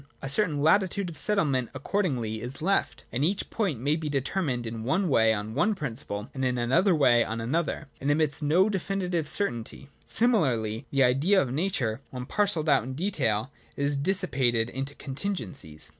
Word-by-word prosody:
A 135 - -5
certain 150 -4 +1
latitude 190 +2 +2
of 155 - -11
settlement 145 - +1
accordingly 130 - -1
is 125 +3 -5
left: 195 +5 0
and 125 +4 -1
each 190 +5 -1
point 190 - -1
may 145 +5 +1
be 160 -2 -4
determined 140 -2 -1
in 110 0 -5
one 165 - +1
way 110 -5 +4
on 110 0 -3
one 175 - +2
principle, 115 - -4
in 135 - -4
another 130 - +2
way 125 -6 +4
on 115 +1 -4
another, 155 +6 -2
and 140 - -2
admits 150 0 +1
of 145 - -1
no 180 +6 +4
definitive 185 -4 -2
certainty. 135 - -1 0.2
Similarly 135 - +2
the 135 -1 +3
Idea 140 +11 +3
of 130 -7 -1
Nature, 135 - -1
when 125 -1 -6
parcelled 190 -2 0
out 140 -3 +4
in 130 +4 -6
detail, 130 - -1 0.3
is 140 0 +1
dissi 185 +6 +1
pated 120 -3 +1
into 135 +2 -4
contingencies. 130 - -5
140 Hz, 175 wpm, -27 LUFS, 120-180 Hz, 0.3 s, way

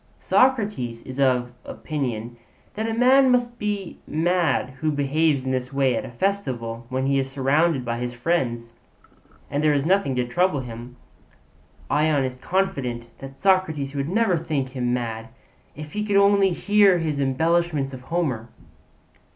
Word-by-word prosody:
Socrates 210 - +1
is 130 +1 -8
of 125 -2 +2
opinion 120 -6 -4 0.4
that 220 +2 -3
a - - -1
man 260 +3 +5
must 245 -1 +1
be 205 -3 -3
mad 165 -4 +1
who 155 +1 0
behaves 145 0 +1
in 130 - -1
this 130 0 -2
way 135 -2 +2
at - - -2
a - - -7
festival 120 -7 -3
when 130 0 -1
he 135 0 +2
is 135 0 -2
surrounded 135 +1 +1
by 120 0 -2
his 120 0 -3
friends 120 -4 -2 0.8
and 145 +1 -1
there 150 -1 +4
is 140 0 0
nothing 185 -7 +2
to 125 -1 0
trouble 165 +2 +1
him. 120 0 -9 1.0
Ion 150 -2 +2
is 130 -1 -2
confident 125 -7 -2
that 135 0 -10
Socrates 175 -8 +1
would 140 +1 -2
never 210 -2 +2
think 150 -5 -2
him 125 -2 -2
mad 115 -2 -3 0.5
if 150 +1 -9
he 210 - -2
could 205 -1 +1
only 200 -1 +5
hear 200 +1 +4
his 155 -4 -2
embellishments 150 +1 +1
of 130 - -8
Homer. 130 -6 -2
140 Hz, 160 wpm, -23 LUFS, 125-180 Hz, 1.0 s, man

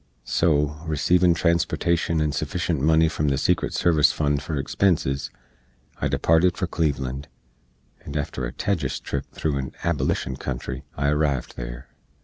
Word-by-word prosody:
So, 75 0 +2
receevin 85 +3 +3
transportashen 85 -1 +1
and 75 -1 0
suffishent 85 +1 -1
money 80 +3 +4
from 75 -2 -1
the 70 -1 +2
secret - - +1
service 80 -4 +4
fund 75 -2 0
for 80 +1 -4
expenses, 70 -1 0 0.7
I - - 0
departed 85 +2 +3
for - - 0
Cleveland, 70 -5 -2 0.8
and 70 - -5
after 65 -4 -3
a - - -6
tejus 80 0 -1
trip 70 -1 -4
thro' 75 -3 -1
an 65 -1 -4
Ablishn 70 -4 0
country, 65 +2 -5
I 70 +1 +1
arrived 75 -3 0
there. - - -7
75 Hz, 140 wpm, -24 LUFS, 70-85 Hz, 0.8 s, money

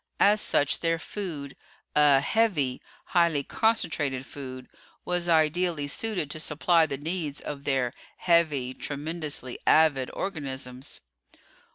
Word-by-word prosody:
As 210 +1 +5
such 145 - +1
their 165 0 +1
food 160 -6 -6 0.4
a 145 -2 +6
"heavy," 150 - +1 0.2
highly 170 -5 +2
concentrated 150 - 0
food 130 -3 -8 0.4
was 175 -1 0
ideally 160 -1 +2
suited 180 -2 -2
to 155 - -5
supply 160 +2 +2
the 140 - -4
needs 155 -1 -3
of 140 -1 -7
their 130 -3 0 0.2
"heavy," 155 -7 +2
tremendously 150 -2 -3
avid 145 -5 +4
organisms. 135 -7 -5
150 Hz, 110 wpm, -27 LUFS, 140-170 Hz, 0.4 s, a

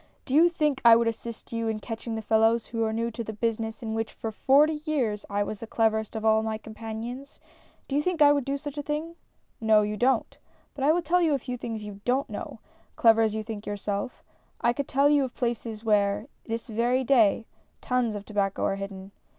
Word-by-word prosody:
Do 260 - -5
you 330 +4 +6
think 300 -5 0
I 230 -1 +9
would 230 0 +2
assist 230 +1 -5
you 230 0 -1
in 220 -1 -1
catching 225 +1 -5
the 220 - -4
fellows 225 +1 +3
who 230 -1 -2
are 220 - 0
new 230 +1 -1
to 230 +1 -5
the 220 - -6
business 225 +1 -2
in 220 -1 -3
which 225 0 -2
for 225 - -5
forty 295 +7 +3
years 245 -10 -1
I 205 0 0
was 205 0 -5
the 230 - -7
cleverest 220 -1 0
of 220 0 -3
all 220 0 +4
my 220 0 -2
companions! 225 +5 -7 0.5
Do 275 - -3
you 290 - +3
think 360 +1 -1
I 290 -1 +7
would 285 -2 0
do 275 +2 -2
such 290 0 -6
a - - -1
thing? 305 +3 -4 0.4
No, 220 -1 +4
you 210 0 -2
don't. 250 0 +1 0.4
But 275 - -2
I 300 - +6
will 345 +2 +1
tell 345 +3 +2
a 335 -2 +3
fft^ 255 -3 -2
things 225 -3 -5
you 205 -1 -9
don't 260 +3 0
know, - - -6 0.4
clever 225 -1 +5
as 220 -1 +1
you 220 - -2
think 215 -1 -7
yourself. 205 +3 -4 0.4
I 235 - +2
could 280 +2 -3
tell 275 +2 +3
you 290 -2 +4
of 255 - -9
places 230 -3 -3
where, 205 -1 +2 0.2
this 230 0 -4
very 240 +3 0
day, 230 -4 +3 0.3
tons 250 -4 0
of 205 0 -6
tobacco 200 -2 -1
are 195 - 0
hidden. 195 0 -7
230 Hz, 225 wpm, -27 LUFS, 220-270 Hz, 0.5 s, I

